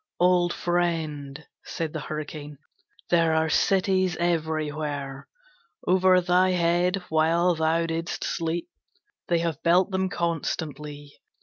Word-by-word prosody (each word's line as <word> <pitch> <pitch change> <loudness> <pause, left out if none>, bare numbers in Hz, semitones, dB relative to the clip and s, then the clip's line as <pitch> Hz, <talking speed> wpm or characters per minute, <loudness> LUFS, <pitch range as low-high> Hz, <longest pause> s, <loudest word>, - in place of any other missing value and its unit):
'Old 175 -1 +3
friend,' 160 -5 -2 0.2
said 165 -3 -4
the 155 - -3
Hurricane, 150 -1 -6 0.5
'there 165 -2 +3
are 160 0 +2
cities 185 +1 +2
everywhere. 155 -4 -2 0.6
Over 185 0 +4
thy 180 +1 +3
head 175 +1 +2
while 165 +3 +3
thou 160 +1 +1
didst 165 +1 -3
sleep 165 +1 -2 0.6
they 170 - +2
have 165 -3 -2
built 180 +3 +3
them 190 0 0
constantly. 150 -4 -4
165 Hz, 110 wpm, -26 LUFS, 155-175 Hz, 0.6 s, Over